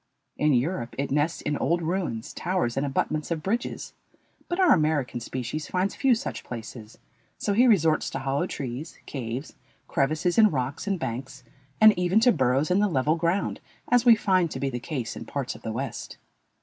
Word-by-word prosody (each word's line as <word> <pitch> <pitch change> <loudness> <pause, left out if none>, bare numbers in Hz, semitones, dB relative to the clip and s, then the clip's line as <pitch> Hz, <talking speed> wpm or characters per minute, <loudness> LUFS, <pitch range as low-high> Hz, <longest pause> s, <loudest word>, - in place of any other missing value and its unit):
In 150 -1 +2
Europe 125 -1 -1
it 140 0 -2
nests 150 +3 0
in 150 - -1
old 170 0 0
ruins, 160 -10 -2
towers, 175 -9 -1
and 140 +1 0
abutments 150 +2 -1
of 165 -2 -2
bridges, 230 +5 -3 0.6
but 350 +1 -2
our 370 -2 +6
American 150 -6 +1
species 130 +5 -4
finds 185 +2 0
few 265 -3 +3
such 225 - -5
places, 115 -1 -8 0.4
so 205 - -1
he 245 +5 +5
resorts 165 -9 +3
to - - -4
hollow 140 +6 -1
trees, 135 +2 -6
caves, 130 +1 -5 0.3
crevices 155 +8 +1
in 215 -1 +7
rocks, 135 +3 -3
and 195 -1 +1
banks, 130 -1 -5 0.4
and 215 0 +8
even 180 +4 +3
to 245 +1 +6
burrows 135 - +1
in 185 - +4
the 210 - +3
level 150 -2 +1
ground, 170 +4 0 0.3
as 245 -1 +4
we 240 -2 +8
find 185 -5 +2
to - - -5
be 135 -1 -1
the 125 - -3
case 130 -3 -4
in - - -7
parts 140 -3 -3
of - - -13
the 110 - -4
West. 130 +5 -5
155 Hz, 190 wpm, -26 LUFS, 130-185 Hz, 0.6 s, and